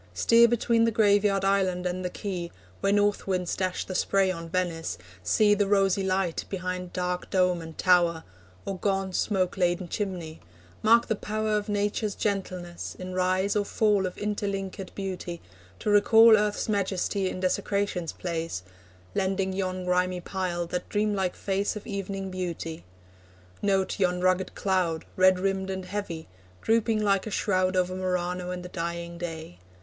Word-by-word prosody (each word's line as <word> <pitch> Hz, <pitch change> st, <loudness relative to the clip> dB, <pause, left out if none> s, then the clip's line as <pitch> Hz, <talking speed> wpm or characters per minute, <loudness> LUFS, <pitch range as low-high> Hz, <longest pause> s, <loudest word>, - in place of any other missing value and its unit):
Steer 230 Hz, -, +6 dB
Between 230 Hz, 0 st, +2 dB
the -, -, +3 dB
graveyard 205 Hz, -3 st, +3 dB
island 190 Hz, -2 st, +1 dB
and 180 Hz, +1 st, -2 dB
the 180 Hz, -, -1 dB
quay, 180 Hz, -3 st, -5 dB, 0.3 s
Where 195 Hz, -, +1 dB
North 205 Hz, 0 st, +2 dB
winds 180 Hz, -2 st, 0 dB
dash 185 Hz, -1 st, -2 dB
the 185 Hz, -, -5 dB
spray 195 Hz, +1 st, +2 dB
on 165 Hz, -2 st, -6 dB
Venice; 170 Hz, -, -2 dB, 0.2 s
see 205 Hz, -, +4 dB
The 205 Hz, -1 st, +1 dB
rosy 195 Hz, -1 st, +3 dB
light 190 Hz, -2 st, 0 dB
behind 180 Hz, -1 st, -4 dB
dark 180 Hz, 0 st, -2 dB
dome 180 Hz, -2 st, +2 dB
and 160 Hz, -1 st, -10 dB
tower, 175 Hz, -3 st, +3 dB, 0.4 s
Or 195 Hz, -2 st, -4 dB
gaunt 195 Hz, -2 st, -1 dB
smoke 190 Hz, -3 st, 0 dB
laden 175 Hz, 0 st, +1 dB
chimney; 175 Hz, -6 st, -4 dB, 0.4 s
mark 230 Hz, +2 st, +5 dB
the 220 Hz, -, 0 dB
power 215 Hz, +1 st, -1 dB
Of 210 Hz, 0 st, -2 dB
Nature's 205 Hz, 0 st, -1 dB
gentleness, 185 Hz, -4 st, -3 dB
in 185 Hz, 0 st, -6 dB
rise 185 Hz, +2 st, +1 dB
or 205 Hz, -, +2 dB
fall 205 Hz, -2 st, +2 dB
Of 180 Hz, -, -8 dB
interlinked 200 Hz, -2 st, -3 dB
beauty, 185 Hz, -3 st, -4 dB, 0.4 s
to 210 Hz, -, -1 dB
recall 220 Hz, +2 st, +7 dB
Earth's 210 Hz, -1 st, 0 dB
majesty 195 Hz, -1 st, 0 dB
in 185 Hz, -, -5 dB
desecration's 190 Hz, -2 st, -1 dB
place, 165 Hz, -, -4 dB, 0.5 s
Lending 190 Hz, 0 st, 0 dB
yon 185 Hz, -1 st, -2 dB
grimy 180 Hz, 0 st, +1 dB
pile 175 Hz, -1 st, -2 dB
that 180 Hz, +1 st, -4 dB
dream 210 Hz, 0 st, +1 dB
like 190 Hz, -3 st, -1 dB
face 200 Hz, +1 st, -1 dB
Of 210 Hz, -, -7 dB
evening 195 Hz, -2 st, -4 dB
beauty; 170 Hz, -, -5 dB, 0.8 s
note 195 Hz, 0 st, +1 dB
yon 180 Hz, -2 st, +2 dB
rugged 185 Hz, 0 st, +1 dB
cloud, 180 Hz, -4 st, 0 dB
Red 185 Hz, 0 st, +5 dB
rimmed 195 Hz, 0 st, -1 dB
and 190 Hz, -1 st, -4 dB
heavy, 185 Hz, -4 st, -5 dB, 0.4 s
drooping 225 Hz, -1 st, +2 dB
like 200 Hz, 0 st, +2 dB
a -, -, -2 dB
shroud 185 Hz, -2 st, +1 dB
Over 185 Hz, 0 st, +1 dB
Murano 180 Hz, -1 st, -2 dB
in 180 Hz, 0 st, -4 dB
the 180 Hz, -, -8 dB
dying 170 Hz, 0 st, -4 dB
day. 160 Hz, -, -6 dB
185 Hz, 160 wpm, -27 LUFS, 180-200 Hz, 0.8 s, recall